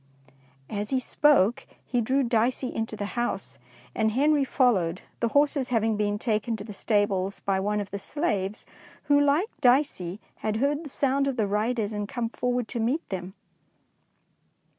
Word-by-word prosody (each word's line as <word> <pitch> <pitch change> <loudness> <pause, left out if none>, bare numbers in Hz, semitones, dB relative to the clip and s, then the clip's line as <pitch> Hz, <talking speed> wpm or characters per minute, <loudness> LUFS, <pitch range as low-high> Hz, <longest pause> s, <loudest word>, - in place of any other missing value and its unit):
'^ - - -30 0.3
As 205 0 -4
he 265 - +1
spoke, 250 -5 +3 0.2
he 245 -2 0
drew 265 +5 +1
Dicey 240 +2 0
into 225 0 -3
the 205 -1 -5
house, 240 0 -2 0.3
and 220 0 +1
Henry 290 +3 +3
followed, 195 -11 +1 0.2
the 235 - +1
horses 285 +1 +2
having 225 -3 +1
been 205 0 0
taken 220 0 -1
to 205 - -7
the 210 0 -8
stables 200 -2 0
by 195 -1 0
one 210 +2 0
of 200 -2 -5
the 200 - -4
slaves, 205 - -2 0.4
who, 285 0 +4
like 290 +9 +2
Dicey, 245 - +2 0.2
had 215 0 -2
heard 285 +5 0
the 300 - -8
sound 275 +1 +1
of 270 -2 -2
the 220 - +2
riders 215 +1 -1
and 210 -1 -3
come 235 -2 -2
forward 245 -1 -1
to 240 - -3
meet 255 +9 0
them. 185 0 -5
225 Hz, 170 wpm, -26 LUFS, 205-265 Hz, 0.4 s, who